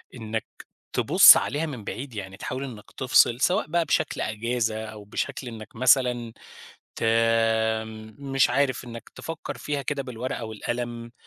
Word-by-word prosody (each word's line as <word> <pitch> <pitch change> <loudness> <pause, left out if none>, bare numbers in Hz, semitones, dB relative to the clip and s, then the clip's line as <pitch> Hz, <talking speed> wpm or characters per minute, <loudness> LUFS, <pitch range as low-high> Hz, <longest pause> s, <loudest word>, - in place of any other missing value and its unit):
إنَّك 110 -2 -4 0.5
تبص - - +8
عليها 150 +4 -1
من 130 -9 -7
بعيد؟ 125 +3 -6
يعني 95 -1 -7
تحاول 130 +2 -4
إنَّك 115 -7 -9
تفصل، 125 -2 +4
سواء 180 0 +2
بقى 170 +1 +1
بشكل - - 0
إجازة، 110 0 -2
أو 110 -1 -10
بشكل 105 +5 -4
إنَّك 110 -2 -9
مثلًا 125 -1 +3 0.6
ت - - -3 1.1
مش 135 -2 +1
عارف 135 -3 +1
إنَّك 115 -2 -9
تفكر 165 -1 -7
فيها 145 -1 -3
كده 140 +1 -2
بالورقة 125 -1 -5
والقلم، 120 +2 -5
120 Hz, 140 wpm, -25 LUFS, 110-135 Hz, 1.1 s, تبص